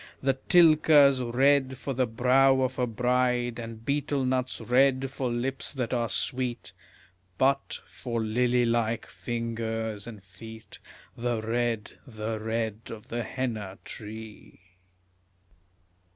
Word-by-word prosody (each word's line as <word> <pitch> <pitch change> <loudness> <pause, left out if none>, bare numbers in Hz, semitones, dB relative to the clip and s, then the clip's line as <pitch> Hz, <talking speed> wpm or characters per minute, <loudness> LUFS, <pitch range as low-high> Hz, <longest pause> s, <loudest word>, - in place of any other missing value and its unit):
The 135 0 +1 0.2
tilka's 155 -5 +6
red 130 +2 +2
for 135 +3 -4
the 130 0 +1
brow 130 +3 +4
of 130 0 -1
a 125 - +1
bride, 125 +1 0
And 115 -1 -8
betel 140 -1 0
nut's 130 0 -1
red 135 +1 +2
for 130 -2 -2
lips 130 +4 -3
that 125 -4 -3
are 120 -2 0
sweet; 125 -2 -2 0.7
But, 135 +1 +1
for 120 -2 -5
lily 120 +2 +2
like 115 -1 0
fingers 115 -2 -4
and 110 -4 -10
feet, 110 +3 -12 0.4
The 120 -1 -1
red, 115 -1 -2
the 110 -2 -4
red 110 -1 -2
of 110 -2 -9
the 120 +1 -2
henna 110 -5 -4
tree. 110 -2 -10
120 Hz, 125 wpm, -27 LUFS, 115-130 Hz, 0.7 s, tilka's